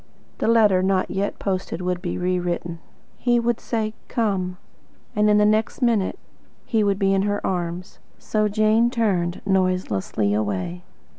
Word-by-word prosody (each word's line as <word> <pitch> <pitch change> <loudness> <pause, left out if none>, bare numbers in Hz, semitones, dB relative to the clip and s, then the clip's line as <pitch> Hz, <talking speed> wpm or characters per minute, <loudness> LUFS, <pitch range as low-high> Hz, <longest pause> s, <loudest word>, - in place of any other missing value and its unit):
The - - 0
letter, 215 -5 +5
not 190 0 +1
yet 200 +1 -2
posted, 185 -3 -3
would 180 -1 -2
be 175 -3 -3
rewritten. 175 -2 -2 0.4
He 240 -1 +2
would 235 0 0
say 220 -2 -2
"COME" 190 -6 -1 0.6
and 210 0 +3
the 210 - +5
next 215 +1 +1
minute 230 - +1 0.5
he 220 -3 +1
would 200 -1 +1
be 195 -1 +2
in 195 - +2
her 205 0 0
arms. 175 -1 -3 0.2
So 215 -1 0
Jane 215 +3 +3
turned 190 -8 0
noiselessly 185 - 0
away. 95 -5 -2
195 Hz, 145 wpm, -23 LUFS, 180-215 Hz, 0.6 s, letter